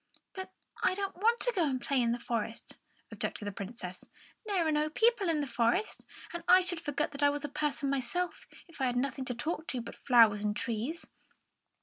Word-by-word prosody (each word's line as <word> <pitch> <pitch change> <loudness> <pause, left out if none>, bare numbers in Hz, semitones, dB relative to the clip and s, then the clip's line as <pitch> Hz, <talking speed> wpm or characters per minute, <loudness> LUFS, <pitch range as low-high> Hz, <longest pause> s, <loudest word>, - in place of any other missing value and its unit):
"But 380 0 -6 0.3
I - - +3
don't 395 -1 -3
want 455 +6 +3
to - - +1
go 360 - +3
and 265 -3 0
play 250 +2 +1
in 235 -1 +2
the 240 - 0
forest," 230 -1 -4 0.3
objected 210 - -4
the 205 - -2
Princess. 190 -2 -7 0.4
"There 380 -5 +1
are - - +2
no 300 0 +1
people 445 +2 +3
in 310 -2 +2
the - - -1
forest; 255 - 0 0.3
and 345 - -5
I 370 +1 +8
should 355 -2 -3
forget 290 -2 -2
I 285 - +6
was 290 0 -2
a - - -4
person 285 -1 -1
myself, 275 +7 -2 0.2
if 330 -5 -11
I 260 - +3
had 245 - -1
nothing 265 +1 -1
to 250 - -2
talk 315 +6 -3
to 255 - -2
but - - -8
the - - -20
flowers 225 -5 +6
and 210 0 0
the - - -3
trees." 235 +9 -3
285 Hz, 220 wpm, -31 LUFS, 240-345 Hz, 0.4 s, I